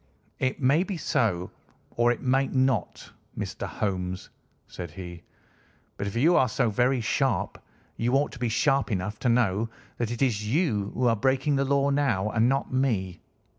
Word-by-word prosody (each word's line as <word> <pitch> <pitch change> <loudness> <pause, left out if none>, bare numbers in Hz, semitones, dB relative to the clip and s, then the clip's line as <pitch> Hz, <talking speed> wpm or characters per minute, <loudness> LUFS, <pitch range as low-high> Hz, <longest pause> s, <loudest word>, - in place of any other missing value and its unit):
"It 130 0 -1
may 140 +5 +3
be 190 -1 -3
so, 110 - 0 0.4
or 120 0 +2
it 120 - -4
may 135 +1 +2
not, 130 -6 -1 0.3
Mr. - - -4
Holmes," 90 -2 -3 0.4
said 85 - -7
he, 85 +1 -9 0.7
"but 100 - -4
if 100 - -5
you 160 +9 +4
are 130 - +4
so 115 - +1
very 125 +4 +2
sharp 115 -4 -1 0.3
you 120 +3 +1
ought 145 +2 +2
to 125 - -11
be 120 -1 0
sharp 135 +3 +1
enough 105 +2 -2
to 125 - +1
know 115 -2 +2 0.3
that 120 -2 -1
it 120 +3 -1
is 105 -5 0
you 120 - +1
who 125 - 0
are 115 -1 +4
breaking 135 +5 +1
the 140 0 +1
law 140 +1 +2
now, 115 -8 +1
and 115 +1 +3
not 135 -1 -1
me. 105 -9 0
120 Hz, 175 wpm, -26 LUFS, 105-135 Hz, 0.7 s, you